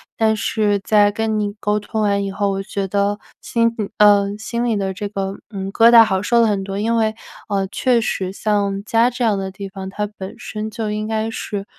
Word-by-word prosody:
但 220 -1 +2
是 210 -4 +1
在 205 -1 +4
跟 220 0 -1
你 205 -1 -2
沟 210 0 0
通 215 +1 -3
完 200 -1 +1
以 195 - -3
后， 200 0 0
我 195 0 -2
觉 195 0 -3
得 200 +1 0 0.2
心 230 -1 +1
里 205 - -2
呃， 205 -1 +4
心 235 +2 -3
里 235 -3 +1
的 195 -1 -2
这 205 +2 -5
个 195 -1 -4
嗯， 195 -2 -5
疙 230 0 +6
瘩 235 -1 +9
好 190 -3 0
受 235 +3 +2
了 230 - +4
很 200 -2 0
多， 195 0 -5
因 225 +3 0
为， 220 -1 +1 0.3
呃， 195 -1 0
确 250 -2 +2
实 190 -4 -2
像 200 -1 -1
家 230 +2 +3
这 245 0 -2
样 210 -3 +2
的 190 0 -3
地 195 +1 -7
方， 190 -1 -7
它 210 +2 -3
本 190 0 -7
身 215 0 -5
就 220 -1 -4
应 215 0 -3
该 220 0 -1
是 200 -3 -5
205 Hz, 245 characters per minute, -20 LUFS, 195-220 Hz, 0.3 s, 瘩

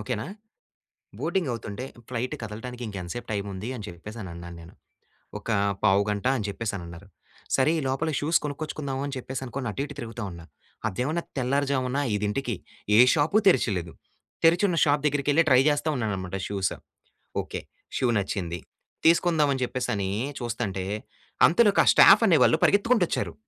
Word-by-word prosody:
Okay 105 - -2
నా. 130 - -5 0.9
Boarding 185 -7 -1
అవుతుంటే, 115 +1 -5 0.2
flight 125 0 -3
కదలటానికి, 120 +3 -7
"ఇంక 100 - -7
ఎంతసేపు 115 +8 -6
టైమ్ 100 -1 -2
ఉంది," 100 +5 -5
అని 105 - -8
చెప్పేసి 105 +7 -9
అని 95 - -7
అన్నాను 85 0 -9
నేను. 85 - -14 0.7
"ఒక - - -10 0.3
పావుగంట" 100 +1 +2
అని 105 - -3
చెప్పేసని 100 -2 -4
అన్నారు. 85 +4 -11 0.5
సరే, 135 +4 +3
ఈ - - -3
లోపల 135 +5 -1
షూస్ 160 +3 +3
కొనుక్కొచ్చుకుందాం 145 -2 -4
అని 140 -1 -4
చెప్పేసి 130 +1 -5
అనుకోని 130 0 -4
అటు 135 - -3
ఇటు 145 - -10
తిరుగుతూ 115 -2 -6
ఉన్నా. 85 -1 -10 0.4
అదేమన్నా 145 - -2 0.2
తెల్లారుజామున 135 0 0 0.2
5 105 0 0
ఇంటికి 125 -1 -2 0.4
ఏ - - +7
షాపు 160 +8 +3
తెరిచలేదు. 90 - +2 0.5
తెరిచున్న 175 +1 +4
షాప్ 145 0 +2
దగ్గరికెళ్లి 145 +3 +2
ట్రై 130 0 +6
చేస్తా 145 +2 0
ఉన్నానన్నమాట 95 -4 -3
షూస్. 95 -2 -1 0.7
ఓకే, - - -6 0.4
షూ 130 - +1
నచ్చింది 90 -4 -3 0.5
తీసుకుందాం, 165 -3 +4
అని 130 - -4
చెప్పేసి 125 0 -3
అని 95 -1 -2 0.3
చూస్తుంటే, 110 -6 -3 0.6
అంతలోకి 205 +4 +4
ఆ - - -3
స్టాఫ్ 215 - +8
అనే 165 -4 +5
వాళ్ళు 115 - +4
పరిగెత్తుకుంటూ 205 0 +3
వచ్చారు. - - -2
125 Hz, 155 wpm, -26 LUFS, 100-145 Hz, 0.9 s, స్టాఫ్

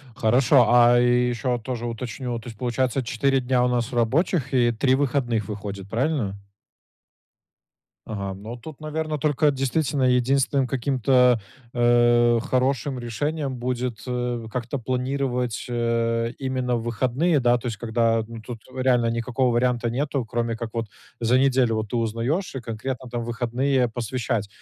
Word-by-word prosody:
Хорошо. 120 +3 +4
А, 120 0 +6
и 125 0 +3
ещё 125 +1 -1
вот 120 -2 -2
тоже 120 -1 -4
уточню. 120 +1 -4
То 115 - -10
есть, 115 -3 -10
получается, 125 +2 0
4 135 +3 +1
дня 125 0 +1
у - - +2
нас 120 0 -1
рабочих 135 +5 +1
и 120 -2 +4
3 130 +3 +2
выходных 125 -6 0
выходит, 100 -2 -6
правильно? 115 -3 -1 1.7
Ага, 100 -3 -4
ну, 110 +5 -8
тут, 140 +5 -11
наверно, 155 0 -3
только 150 0 +2
действительно 135 +1 0
единственным 130 +2 +2
каким-то, 125 -2 +3 0.3
э, 120 0 +4
хорошим 130 +1 0
решением 135 +4 -3
будет 125 -2 -3
эу 120 -2 -2
как-то 120 +3 -3
планировать, 125 -1 -2
а, 115 -1 0
именно 130 -2 -1
в 115 - -3
выходные, 130 +8 +1
да? 120 -1 +3
То 120 - -8
есть 115 -3 -3
когда, 115 +1 +1
ну, 115 0 -9
тут 115 +1 -7
в 130 - -14
реально 125 -2 +3
никакого 120 +2 0
варианта 120 0 +1
нету, 135 +2 -1
кроме 115 0 -2
как 115 0 -5
вот 115 -1 -2 0.3
за 120 +2 +3
неделю 130 -4 +3
вот 110 -1 -3
ты - - -1
узнаешь 115 - -1
и - - -3
конкретно 120 +3 -5
там 120 -1 -4
выходные 125 +2 0
посвящать. 115 -2 -2
125 Hz, 155 wpm, -24 LUFS, 115-130 Hz, 1.7 s, А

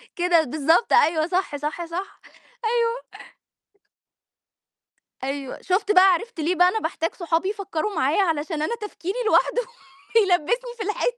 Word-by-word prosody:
كده 350 -2 +3
بالضبط، 315 - +1
أيوه 320 -8 +4
صح، 365 -3 -1
صح، 300 +4 -4
صح، 355 +4 -6 0.5
أيوه. 465 +1 +1 2.3
أيوه، 275 0 -4
شُفت 390 +2 0
بقى 375 -1 +7
عرِفت 450 +1 -5
ليه 330 +4 0
بقى 360 +1 +5
أنا 440 +4 -1
باحتاج 330 -1 -3
صحابي 345 +1 -1
يفكّروا 400 -1 -3
معايا 310 +5 +2
علشان 315 -2 -2
أنا 390 +10 -1
تفكيري 415 -2 -6
لوحده - - +3 0.7
يلبِّسني 475 +9 -1
في 435 - -4
الحيط. 425 +4 -1
360 Hz, 135 wpm, -23 LUFS, 320-420 Hz, 2.3 s, بقى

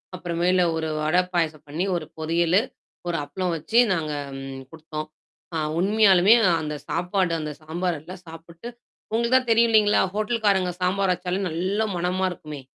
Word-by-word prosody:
அப்புறமேல, 175 +1 +1
1 160 -1 -2
வடை 155 +4 +3
பாயசம் 155 -3 -1
பண்ணீ 160 +6 -2
1 170 - -3
பொறியலு, 170 +4 +2 0.5
1 170 - -1
அப்ளம் 180 +4 -3
வச்சு 190 +9 -2 0.2
நாங்க 155 -3 -2 0.3
ம் 135 0 -7
குடுத்தோம். 155 -1 -7 0.5
ஆ - - 0 0.2
உண்மையாலுமே 200 0 +5 0.3
அந்த 150 -1 -4
சாப்பாடு 180 -1 0
அந்த 150 -1 -4
சாம்பார் 170 +1 -2
எல்லாம் 180 +3 -11
சாப்புட்டு 165 +4 -11 0.4
உங்களுக்கு 235 +3 +2
தான் 255 -2 -2
தெரியும் 230 +1 +4
இல்லைங்களா? 210 -1 +4
ஹோட்டல்காரங்க 205 -4 +1
சாம்பார் 190 +1 +1
வச்சாலே 180 +1 -3
நல்லா 190 +7 -1
மணமா 180 +2 0
இருக்குமே! 150 -4 -8
180 Hz, 145 wpm, -24 LUFS, 160-195 Hz, 0.5 s, உண்மையாலுமே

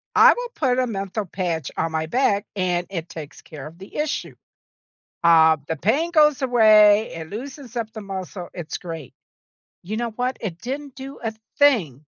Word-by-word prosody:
I - - +8
will - - -5
put 255 -3 +1
a 255 - +1
menthol 200 0 -3
patch 170 -5 -3
on 165 0 0
my 160 0 -1
back 210 -3 +1
and 180 -2 0
it 170 -3 -5
takes 155 -1 -9
care 150 -4 -10
of 165 +2 -13
the 195 +2 -13
issue. 300 0 -2 0.9
Uh, 160 -1 +6
the 160 - -1
pain 275 - +1
goes 300 -4 +4
away, 215 -4 +5
it 160 -1 -7
loosens 255 +3 -8
up 225 -2 -3
the 220 - -7
muscle, 190 -2 -6
it's 170 -3 -5
great. 165 -6 -8 0.7
You 210 +5 -4
know 235 -1 -2
what? 250 +3 -2
It 175 -6 -5
didn't 275 +3 -6
do 270 0 -9
a 225 -1 -2 0.3
thing 180 - +3
205 Hz, 175 wpm, -23 LUFS, 170-255 Hz, 0.9 s, I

